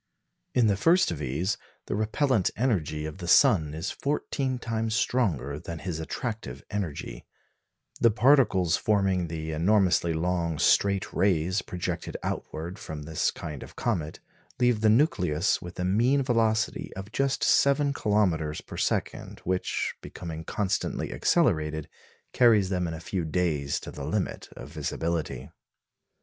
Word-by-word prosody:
In 125 -2 +4
the 105 -2 +3
first 165 - +3
of 80 - -4
these, 80 +9 -1 0.3
the - - -3
repellent 110 0 +1
energy 80 - 0
of 80 +4 -7
the 85 - -6
sun 75 -3 +5
is 80 +5 -3
fourteen 140 -2 -2
times 115 -2 -2
stronger 75 - 0
than 85 +2 -6
his 85 -1 -4
attractive 80 - -5
energy; 85 -11 -4 0.7
the 115 - +5
particles 110 - +4
forming 95 -4 +1
the 80 -1 -4
enormously 90 +1 +3
long 85 0 -1
straight 100 +4 +2
rays 90 0 +2
projected 90 -1 -4
outward 85 +5 -4
from 75 -1 -7
this 80 +1 0
kind 75 -5 -7
of - - -11
comet 85 -10 -2 0.4
leave 120 -3 +3
the 110 - +4
nucleus 100 - +2
with 90 0 -9
a 90 - 0
mean 120 +9 +3
velocity 110 -3 +1
of 95 +2 -7
just 135 +2 0
seven 140 0 +3
kilometres 90 - 0
per - - -10
second, - - -2
which, 90 0 -1
becoming 80 -2 -7
constantly 95 +2 -2
accelerated, 80 -1 +1 0.5
carries 110 -6 +5
them 90 -2 0
in 80 - -4
a - - -7
few 90 +1 -3
days 80 -4 0
to - - -8
the - - -7
limit - - -2
of - - -10
visibility. 85 -2 -3
95 Hz, 140 wpm, -27 LUFS, 80-110 Hz, 0.7 s, sun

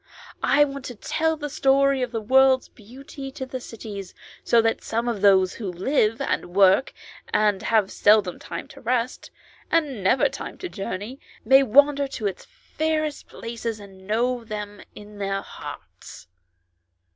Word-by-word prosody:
"I 290 +1 +4
want 275 -1 -7
to 245 - -7
tell 320 +8 -1
the 295 -1 -4
story 275 -2 +2
of 250 -2 -2
the 225 -2 -3
world's 260 +3 +4
beauty 270 +5 -10
to 265 -2 -5
the 260 0 -6
cities, 205 -5 -8 0.3
so 235 - +4
that 225 0 +1
some 230 +2 -2
of 230 -5 -2
those 190 -2 +5
who 205 -5 -5
live, 215 +4 +1
and 175 - -2
work, 195 +6 +5 0.4
and 210 -3 +2
have 215 -4 +1
seldom 205 -3 +3
time 170 - -7
to - - -13
rest, 245 +1 -2 0.4
and 285 - 0
never 220 +8 +4
time - - -7
to 365 - -6
journey, 205 - -6 0.3
may 265 +4 +7
wander 280 +3 +4
in 215 - -1
its 190 - -6
fairest 310 -10 -3
places 230 -1 -5
and 190 -2 -14
know 240 +3 0
them 210 -2 -7
in 210 0 -12
their 195 0 -2
hearts." - - -11
230 Hz, 155 wpm, -24 LUFS, 205-270 Hz, 0.4 s, may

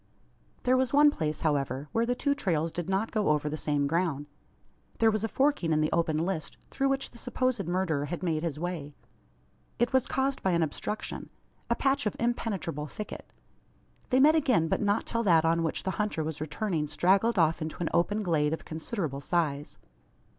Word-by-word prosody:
There 250 +1 +4
was 260 -2 +1
one 295 +1 +7
place, 155 - -3
however, 140 -3 0
where 230 +1 +1
the 245 - +1
two 285 +2 +1
trails 165 - -1
did 175 +1 -4
not 195 +4 0
go 215 -5 +1
over 150 0 +2
the 150 - -3
same 145 -2 0
ground. 155 -2 0 0.7
There 225 -1 +4
was 215 0 -1
a - - +1
forking 265 - +1
in 155 - +3
the 155 0 +1
open 165 -2 +1
list, 165 0 -2
through 275 0 +1
which 270 0 -1
the 235 - -13
supposed 250 -4 -1
murderer 175 -5 0
had 175 +4 -5
made 160 -3 0
his 160 -3 -3
way. 155 -4 -4 0.8
It 240 +3 +1
was 260 -1 +3
caused 270 0 0
by 190 - +1
an 170 -1 +3
obstruction, 160 +7 -4 0.4
a 235 - +3
patch 270 -1 +1
of 210 - -2
impenetrable 200 -10 -2
thicket. 210 +8 -8 0.8
They 255 - +3
met 300 +3 +7
again, 255 - +3
but - - 0
not 205 +1 +1
till 230 - -1
that 165 -7 +4
on 165 +1 +2
which 160 -1 -2
the 190 - -1
hunter 210 -7 -1
was 155 -1 -5
returning 155 0 -2
straggled 195 +8 +2
off 165 -2 +3
into 155 0 -4
an 170 - -1
open 205 +5 +1
glade 155 -4 +1
of 160 - -5
considerable 160 - -4
size. 150 -2 -1
175 Hz, 195 wpm, -29 LUFS, 155-230 Hz, 0.8 s, one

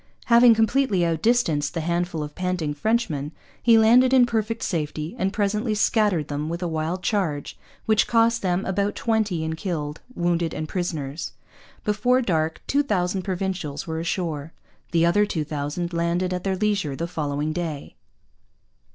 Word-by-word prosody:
Having 235 0 +7
completely 220 -4 +2
outdistanced 165 -4 +1
the 165 - -1
handful 170 -1 -1
of 150 0 -7
panting 180 -4 -2
Frenchmen, 155 -5 -1 0.3
he 230 -2 +6
landed 245 +4 +5
in 250 -2 +7
perfect 225 -1 -2
safety 155 -1 -3
and 190 +1 +1
presently 210 +2 0
scattered 205 -7 +2
them 150 +1 -3
with 170 +2 -4
a - - 0
wild 165 +3 -2
charge 165 -10 -1 0.3
which 220 -1 +3
cost 230 0 +3
them 185 0 0
about 200 +2 -1
twenty 215 -7 0
in 160 0 -2
killed, 160 -4 -4
wounded, 170 -1 0
and 155 - -3
prisoners. 160 -4 -4 0.5
Before 220 +5 +2
dark 160 -9 -1
two 285 - +2
thousand 190 -8 0
Provincials 185 -6 -3
were 160 -1 -3
ashore. 165 -3 -3 0.4
The 170 -1 +3
other 205 +5 +3
two 160 -6 -2
thousand 150 +4 -4
landed 170 +2 0
at 180 - -3
their 195 -1 0
leisure 200 -8 0
the 165 - -3
following 150 -2 -2
day. 160 -4 -5
175 Hz, 155 wpm, -24 LUFS, 160-210 Hz, 0.5 s, Having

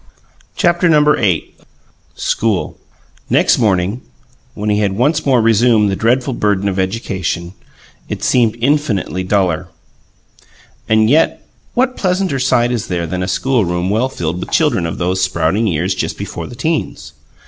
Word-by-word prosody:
CHAPTER 175 0 +2
VIII 150 - +2 0.6
SCHOOL 110 -5 -1 0.5
Next - - +3
morning, 100 +1 +1 0.5
when 105 0 -2
he 105 - +1
had 100 -2 0
once 135 +9 0
more 125 -4 +3
resumed 115 -2 +3
the - - -1
dreadful 125 +5 +1
burden 100 -3 0
of 95 -1 -1
education, 95 -3 -3 0.6
it - - -5
seemed 115 -3 +2
infinitely 120 -9 0
duller. 95 -4 0 1.2
And 110 0 +4
yet 150 +7 +2 0.3
what 255 +1 +1
pleasanter 185 -6 0
sight 120 -2 +2
is 120 -4 -2
there 85 -2 -2
than 90 +3 -3
a 90 - -2
schoolroom 95 -5 0
well 115 +5 +1
filled 85 -7 -3
with - - -6
children 85 - +1
of 80 - -5
those 90 +1 -1
sprouting 90 +4 +1
years 90 +1 0
just - - -3
before - - -6
the 120 - -10
'teens? 160 +4 -3
105 Hz, 145 wpm, -16 LUFS, 95-130 Hz, 1.2 s, And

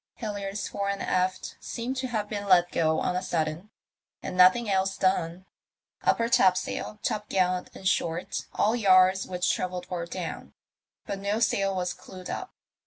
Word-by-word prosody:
Halliards 200 -2 -4
fore 200 0 -3
and 200 0 -2
aft 185 0 -1
seemed 240 +3 -4
to 260 0 -2
have 215 -4 -2
been 205 -1 -4
let 175 -2 +5
go 160 -1 +2
on 180 - -1
a 180 - 0
sudden, 165 +2 -2 0.5
and - - -4
nothing 185 +6 +6
else 190 -1 +1
done. 185 -1 0 0.6
Upper 230 - +2
topsail, 190 -2 +2
top 210 0 -2
gallant 185 -1 +1
—in - - -10
short, 170 -2 -1
all 220 +3 +2
yards 190 -3 +5
which 180 0 0
travelled 180 -1 -3
were 170 -1 -3
down, - - -6 0.5
but 195 - -4
no 200 +2 -1
sail 195 -4 +1
was 180 -1 -1
clewed 185 -1 -9
up. 375 - -5
190 Hz, 165 wpm, -27 LUFS, 180-205 Hz, 0.6 s, nothing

